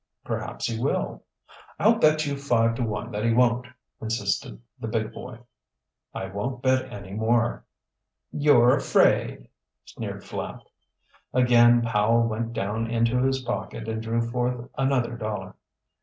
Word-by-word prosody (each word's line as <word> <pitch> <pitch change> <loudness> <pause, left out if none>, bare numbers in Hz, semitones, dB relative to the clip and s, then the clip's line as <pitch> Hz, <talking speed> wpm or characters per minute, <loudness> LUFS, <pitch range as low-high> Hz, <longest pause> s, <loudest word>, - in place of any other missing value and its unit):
"Perhaps - - -4
he 115 -1 -2
will." 135 - -1 0.6
"I'll - - +4
bet 155 0 +4
you 140 -1 -2
five 120 -5 +2
to 115 - -4
one 110 -3 -3
that 105 +1 -3
he 115 - +3
won't," 120 0 +2 0.3
insisted 110 -4 -2 0.2
the 115 - -5
big 110 -1 -2
boy. 125 -2 -8 0.7
"I 95 - -5
won't 105 +7 -4
bet 130 0 +1
any 100 -1 -8
more." 115 +2 +1 0.7
"You're 135 -4 +5
afraid," - - +2 0.4
sneered - - -7
Flapp. - - -6 0.7
Again 120 -1 +5
Powell 115 +1 +2
went 115 +1 -3
down 110 +2 -2
into 115 +1 +1
his 135 0 +1
pocket 115 -2 -4
and 110 0 -3
drew 115 +1 -1
forth 125 +1 -2
another 135 -4 0
dollar. 105 -4 -5
115 Hz, 140 wpm, -25 LUFS, 110-125 Hz, 0.7 s, You're